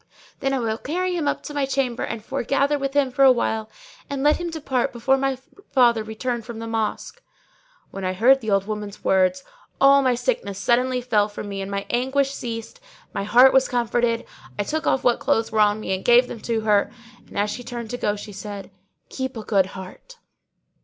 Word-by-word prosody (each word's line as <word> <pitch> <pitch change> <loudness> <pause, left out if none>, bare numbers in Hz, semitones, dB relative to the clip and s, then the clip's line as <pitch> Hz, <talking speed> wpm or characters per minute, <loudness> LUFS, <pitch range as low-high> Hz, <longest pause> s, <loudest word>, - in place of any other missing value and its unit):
Then 270 -1 0
I 270 - +1
will 225 -2 -2
carry 360 +4 -2
him 320 -4 -1
up - - -1
to 295 - -7
my 285 -2 0
chamber 265 -3 -1
and 225 -1 -4
foregather 275 +2 0
with 275 0 -3
him 280 -3 +2
for 265 - -2
a 265 - +8
while, 220 -3 -1 0.4
and 275 -1 -3
let 295 +1 +4
him 345 -1 -4
depart 280 -6 -1
before 245 +2 +2
my 270 -1 -1 0.3
father 235 -4 +4
return 230 +3 -3
from 230 0 -9
the 225 - -6
Mosque.'" 225 - -3 0.7
When 195 - -7
I 185 0 -1
heard 255 +8 +4
the 220 - -4
old 195 -1 +2
woman's 210 -1 -6
words, 185 -1 +2 0.4
all 275 +1 +6
my 255 -2 +2
sickness 245 - -2
suddenly 250 +4 +1
fell 215 -4 +1
from 205 0 -7
me, 195 -1 -4
my 200 0 -4
anguish 265 +3 +1
ceased 230 - -6
and - - -25
my 200 - -3
heart 245 +5 +6
was 265 0 +4
comforted; 240 -1 0 0.3
I - - 0
took 315 +9 -3
off 265 - +2
what 245 -1 +3
clothes 225 +1 0
were 220 - 0
on 210 0 +4
me 190 - -2
and 190 - -3
gave 245 +1 +5
them 230 - -7
to 225 0 -2
her 210 -2 +2 0.4
and, - - -10
as 205 +1 +1
she 245 - -6
turned 235 -2 -6
to 245 - -3
go, 205 -3 0
she 210 +1 -9
said, 200 0 -8 0.4
"Keep 260 -2 -4
a 220 - -5
good 195 -3 +2
heart!" 190 - -11
240 Hz, 215 wpm, -23 LUFS, 210-270 Hz, 0.7 s, a